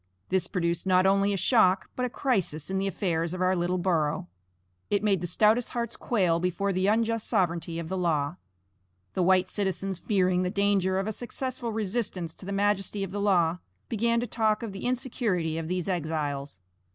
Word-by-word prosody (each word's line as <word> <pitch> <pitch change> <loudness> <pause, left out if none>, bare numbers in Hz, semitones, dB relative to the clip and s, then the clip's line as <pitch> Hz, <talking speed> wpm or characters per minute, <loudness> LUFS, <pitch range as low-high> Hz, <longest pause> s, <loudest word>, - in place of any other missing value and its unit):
This 190 -1 +1
produced 170 -1 -1
not 185 0 +4
only 195 +1 +3
a 200 - 0
shock, 190 -2 +3
but 250 0 0
a - - -7
crisis 190 - -1
in 190 - 0
the 195 - 0
affairs 170 -2 -1
of 185 - -5
our 185 +1 +3
little 175 +1 0
borough. 160 - 0 0.6
It 205 0 +1
made 195 -5 +2
the 175 - -2
stoutest 215 +7 +3
hearts 235 -1 -2
quail 180 -8 +1
before 180 +3 0
the 185 +1 +1
unjust 225 +1 +1
sovereignty 170 -2 0
of 165 -1 -4
the 190 +2 -2
law. 155 -5 0 0.8
The - - 0
white 185 +1 +4
citizens 195 -1 -2
fearing 185 -2 +2
the 180 - 0
danger 200 -2 +1
of 195 - 0
a 220 - -1
successful 245 +1 -4
resistance 205 -5 -2
to 185 - -12
the - - -3
majesty 200 0 0
of 190 - -5
the 205 +1 -3
law, 180 -4 +2 0.3
began 230 +1 +1
to - - -1
talk 220 -1 0
of 225 - -4
the 195 - -7
insecurity 230 - -1
of 160 - -5
these 180 +1 -2
exiles. 150 - -3
190 Hz, 190 wpm, -27 LUFS, 175-210 Hz, 0.8 s, not